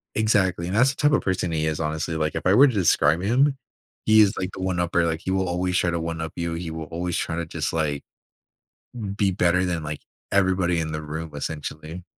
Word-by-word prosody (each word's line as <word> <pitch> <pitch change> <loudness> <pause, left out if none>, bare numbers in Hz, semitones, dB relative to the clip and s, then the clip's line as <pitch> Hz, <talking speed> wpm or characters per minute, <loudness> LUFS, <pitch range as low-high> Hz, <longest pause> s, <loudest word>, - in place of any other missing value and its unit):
Exactly. 95 -5 +1
And 95 - -2
that's 125 +4 +5
the - - -11
type 145 0 +3
of - - +3
person 90 -2 -1
he 80 -1 0
is, 80 0 -2
honestly. 80 +1 -2
Like, 75 -1 -1
if 80 - -4
I 90 - +5
were 140 +4 +8
to 125 - 0
describe 85 -3 +3
him, 135 +7 +2 0.5
he 110 0 +6
is, 100 -2 +3
like, 95 0 -3
the 95 - -7
one 95 -2 -1
upper. 85 -1 +1
Like, 80 0 -2
he 95 - -3
will 95 -1 0
always 90 +1 0
try 85 - +1
to 85 - -1
one 80 0 -4
up 80 0 -5
you. 85 -1 -3
He 85 -1 -4
will 80 -1 -5
always 85 +2 -3
try 80 - -2
to 85 0 -3
just, 80 -1 -3
like, 75 -3 -1 1.1
be 100 -2 +2
better 90 0 +2
than, 85 -3 -2
like, 75 0 -5 0.3
everybody 95 -3 +2
in 80 -1 -3
the 75 0 -4
room, 80 +1 -6
essentially. 80 +3 -6
85 Hz, 235 wpm, -24 LUFS, 80-95 Hz, 1.1 s, were